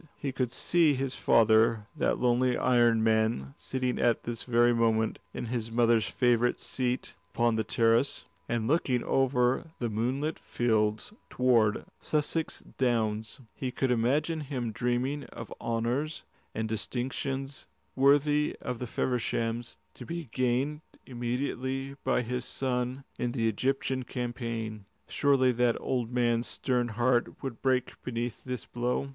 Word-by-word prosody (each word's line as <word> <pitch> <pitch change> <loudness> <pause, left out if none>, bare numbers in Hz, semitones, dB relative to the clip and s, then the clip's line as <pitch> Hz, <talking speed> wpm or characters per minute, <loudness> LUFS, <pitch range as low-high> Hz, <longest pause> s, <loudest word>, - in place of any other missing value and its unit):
He 140 - -3
could 130 -2 -1
see 165 -1 +3
his 135 0 -2
father, 110 -1 +4
that - - +1
lonely 125 0 +2
iron 120 -3 +3
man, 110 -11 +1
sitting 130 -1 -2
at 120 -1 +2
this 115 -1 -4
very 120 0 +3
moment 110 -1 +1
in - - -5
his 115 -1 -3
mother's 115 -3 +3
favourite 120 -1 +2
seat 125 -1 -2 0.2
upon 120 -1 +2
the 110 - +1
terrace, 115 +5 +2 0.2
and 115 -1 0
looking 130 -4 +1
over 130 +2 +1
the 120 -2 -2
moonlit 130 +8 -1
fields 110 - 0 0.2
toward 120 -4 +3
the - - -8
Sussex 155 +1 -1 0.2
Downs; 110 -1 0
he 130 - -3
could 130 +1 0
imagine 145 +8 +1
him 130 -6 -3
dreaming 125 +5 -1
of 115 - -9
honours 120 +7 -1 0.3
and 110 0 -1
distinctions 135 +4 -3 0.3
worthy 145 +2 +3
of 125 -2 -4
the 125 - -4
Fevershams 115 - -1 0.2
to - - -10
be 170 -5 -6
gained 130 +5 0 0.2
immediately 130 +2 -3
by 130 -1 +1
his 125 +1 -3
son 125 0 -2 0.2
in 120 -1 -1
the 115 -4 +1
Egyptian 130 +3 0
campaign. 115 -4 -4 0.2
Surely 135 -3 +3
that 120 -1 +1
old 125 -3 -2
man's 120 -1 +1
stern 125 -2 0
heart 120 +4 0
would 130 -4 -5
break 130 -1 +1
beneath 120 -1 -4
this 125 -3 -5
blow. 125 +3 -2
125 Hz, 140 wpm, -29 LUFS, 115-130 Hz, 0.3 s, father